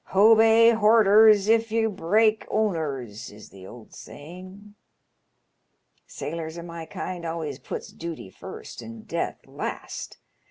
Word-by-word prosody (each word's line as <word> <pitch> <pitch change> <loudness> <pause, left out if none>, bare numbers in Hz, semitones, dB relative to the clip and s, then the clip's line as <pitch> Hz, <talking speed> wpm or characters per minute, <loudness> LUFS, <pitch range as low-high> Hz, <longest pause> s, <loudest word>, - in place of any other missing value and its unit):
' - - -49
Hobey 225 +2 +6
borders 215 -1 +5
if 225 0 +2
yer 225 0 +1
break 215 +3 +1
owners,' 140 - -2
is 105 +1 -14
the 95 -1 -13
old 115 0 -14
saying. 185 +7 -12 1.3
Sailors 160 +1 -6
o' 170 - -7
my 170 -1 -8
kind. 180 -2 -6
always 160 -5 -5
puts - - -7
dooty 165 - -8
first - - -10
and 115 -1 -11
death - - -4
last. - - -7
180 Hz, 125 wpm, -25 LUFS, 150-215 Hz, 1.3 s, Hobey